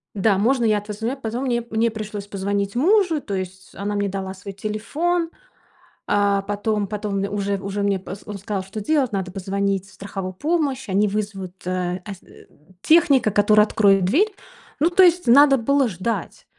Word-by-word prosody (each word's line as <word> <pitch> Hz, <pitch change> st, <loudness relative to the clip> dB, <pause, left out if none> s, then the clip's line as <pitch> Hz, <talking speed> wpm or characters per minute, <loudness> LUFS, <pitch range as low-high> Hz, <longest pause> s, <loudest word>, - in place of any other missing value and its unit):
Да, 200 Hz, 0 st, +2 dB
можно 240 Hz, +4 st, +2 dB
я 215 Hz, -2 st, +3 dB
от 205 Hz, -, -10 dB
вас 210 Hz, -1 st, -6 dB
звоню 230 Hz, +5 st, -2 dB
позвоню. 245 Hz, +1 st, -4 dB
Мне 240 Hz, -1 st, 0 dB
мне 225 Hz, +1 st, +1 dB
пришлось 210 Hz, -2 st, -6 dB
позвонить 200 Hz, +1 st, -2 dB
мужу. 345 Hz, -, +3 dB
То 200 Hz, -6 st, -5 dB
есть 190 Hz, 0 st, -6 dB
она 205 Hz, +1 st, -3 dB
мне 205 Hz, -1 st, 0 dB
дала 190 Hz, 0 st, -4 dB
свой 200 Hz, +1 st, -9 dB
телефон, 305 Hz, -, -2 dB, 0.8 s
а, 200 Hz, -1 st, +2 dB
потом 205 Hz, 0 st, -1 dB
потом 205 Hz, -1 st, -3 dB
уже 200 Hz, 0 st, -2 dB
уже 200 Hz, +1 st, -4 dB
мне 200 Hz, -1 st, +1 dB
поз 190 Hz, +2 st, -8 dB
он 205 Hz, -1 st, -6 dB
сказал, 195 Hz, 0 st, -4 dB
что 195 Hz, +3 st, -7 dB
делать. 265 Hz, +1 st, +1 dB
Надо 190 Hz, -2 st, -3 dB
позвонить 195 Hz, 0 st, -2 dB
в -, -, -19 dB
страховую 195 Hz, -2 st, -6 dB
помощь, 285 Hz, -, -1 dB
они 200 Hz, +2 st, +2 dB
вызовут 195 Hz, -3 st, -4 dB
э, 180 Hz, 0 st, -2 dB
эс 200 Hz, -3 st, -7 dB, 0.6 s
техника, 290 Hz, -9 st, +4 dB
который 210 Hz, +1 st, +5 dB
откроет 195 Hz, -4 st, +3 dB
дверь. 385 Hz, -, +2 dB, 0.5 s
Ну, 320 Hz, +4 st, +3 dB
то 375 Hz, +2 st, +5 dB
есть 355 Hz, 0 st, +4 dB
надо 275 Hz, +3 st, +6 dB
было 275 Hz, +3 st, +2 dB
ждать. 215 Hz, +3 st, -4 dB
205 Hz, 175 wpm, -22 LUFS, 195-245 Hz, 0.8 s, надо